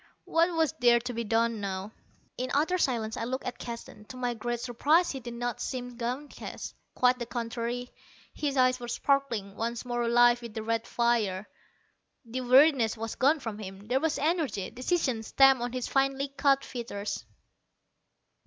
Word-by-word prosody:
What 335 +1 +2
was 320 -3 +2
there 240 -1 +5
to 245 +1 -4
be 235 0 -2
done 225 0 +1
now? 195 +1 -4 0.4
In 255 +1 -3
utter 325 +6 +2
silence 225 -7 0
I - - -2
looked 260 +3 -3
at 250 - -5
Keston. 235 -3 -8
To 255 - -10
my 245 -1 -1
great 240 +1 -3
surprise 285 +9 +2
he 270 - -5
did 240 -1 -7
not 240 -1 -3
seem 245 -2 -4
downcast. 250 +5 -5 0.2
Quite 250 0 +3
the 240 - -4
contrary. 240 +1 -3 0.4
His 285 -2 -2
eyes 255 0 +4
were 240 - -6
sparkling, 235 -7 0
once 230 +2 -3
more 240 -1 -1
alive 240 +1 +5
with 235 -2 -9
the 220 - -3
red 230 0 -1
fire. 220 -5 +1 0.8
The 245 +3 -4
weariness 255 -2 +5
was 225 0 -4
gone 295 +4 +3
from 225 -5 -5
him; 195 0 -8
there 260 +2 +3
was 320 +1 0
energy, 300 - -1
decision 255 -3 0
stamped 270 +3 +5
on 245 0 -2
his 255 -1 -3
finely 275 0 +1
cut 275 0 +2
features. 210 -5 -5
245 Hz, 170 wpm, -29 LUFS, 230-270 Hz, 0.8 s, there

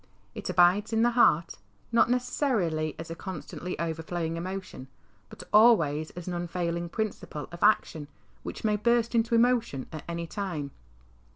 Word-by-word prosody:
It - - -6
abides 180 +4 +4
in 225 +1 +3
the 240 - +4
heart, 170 - +3 0.3
not 230 0 +4
necessarily 220 - 0
as 165 +1 -7
a - - -4
constantly 180 0 -6
overflowing 165 0 -3
emotion, 185 -6 -6 0.4
but - - -10
always 165 -9 +5
as 175 - -7
an 180 - -3
unfailing 170 0 -3
principle 205 -7 -4
of 170 - -10
action, 165 -7 +2 0.3
which - - -7
may 210 -1 +2
burst 235 +2 +2
into 230 0 +2
emotion 230 - +2
at 155 - -7
any 170 0 -3
time. 165 -6 -4
175 Hz, 150 wpm, -28 LUFS, 165-225 Hz, 0.4 s, always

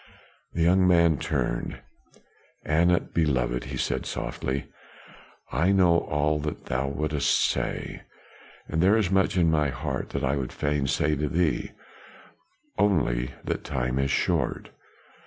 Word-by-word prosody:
The 85 - 0
young 90 +2 +4
man 85 -4 +4
turned. - - -2 0.9
"Anat 85 +3 +2
beloved," 65 -6 0
he - - -5
said - - -2
softly, 65 +1 -3 0.9
"I 80 +9 +2
know 90 -3 +4
all 75 +1 0
that 75 0 -5
thou 65 +2 -1
wouldst 75 +1 -1 0.2
say; - - -2 0.7
and 80 - -1
there 100 +5 +5
is 100 -5 0
much 95 0 +2
in 85 -2 +4
my 75 -2 +2
heart 65 0 -4
that - - -4
I 70 +2 +1
would 65 -2 -3
fain 75 -2 -1
say 75 +3 +1
to 75 0 -1
thee 85 -1 0 1.1
only 70 -12 +2 0.2
that - - -3
the - - -10
time 60 +2 -1
is 70 0 +1
short. - - 0
75 Hz, 140 wpm, -26 LUFS, 70-85 Hz, 1.1 s, there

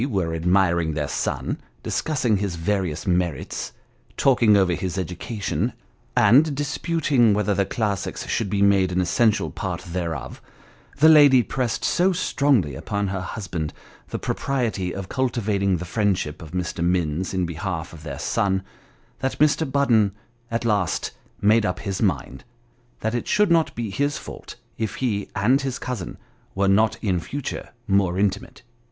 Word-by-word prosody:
were 95 -7 -1
admiring 85 -1 +2
their 75 -1 -1
son, - - -2 0.2
discussing 130 -9 0
his 95 -3 -2
various 85 -2 -1
merits, 90 -5 -1 0.5
talking 120 -6 +5
over 95 -3 +3
his 90 +1 -3
education, 95 +4 -2 0.4
and 145 +4 +5
disputing 145 -5 +2
whether 105 0 +1
the 100 -1 +1
classics 105 -3 -2
should 110 -3 -1
be 100 +1 +1
made 100 -2 +4
an 90 - 0
essential 105 +5 +2
part 90 -4 -4
thereof, 85 -7 -5 0.6
the 155 +2 +6
lady 145 -5 +7
pressed 125 0 -2
so 185 +2 +3
strongly 135 - +1
upon 100 +8 -2
her 95 -1 -3
husband 85 -7 -4 0.4
the - - -3
propriety 115 -9 -1
of 95 0 -5
cultivating 105 -7 0
the 90 - -6
friend 105 0 +1
ship 75 -2 -5
of 80 - -9
Mr. 90 0 -3
Minns 90 0 0
in 95 -1 0
behalf 85 0 -4
of 80 - -11
their 70 -4 -6
son, 95 +3 0 0.6
that 135 0 -2
Mr. 150 -1 +2
Budden 115 -8 +3 0.4
at 115 0 -2
last 100 -8 0 0.3
made 110 +2 +4
up 90 -3 -1
his 95 -2 -3
mind, 65 - -1 0.6
that 110 +1 -1
it 120 - -2
should 210 -3 +3
not 165 -2 +3
be 115 -3 -3
his 145 +7 0
fault - - -9 0.2
if 110 -2 -2
he 105 -6 -2
and 120 +8 +3
his 135 -1 -3
cousin 125 -8 -5 0.4
were 100 0 +2
not 105 +3 +3
in 95 -4 +1
future 140 +10 -5 0.2
more 95 -3 +2
intimate. 100 +3 -1
100 Hz, 155 wpm, -23 LUFS, 90-120 Hz, 0.6 s, lady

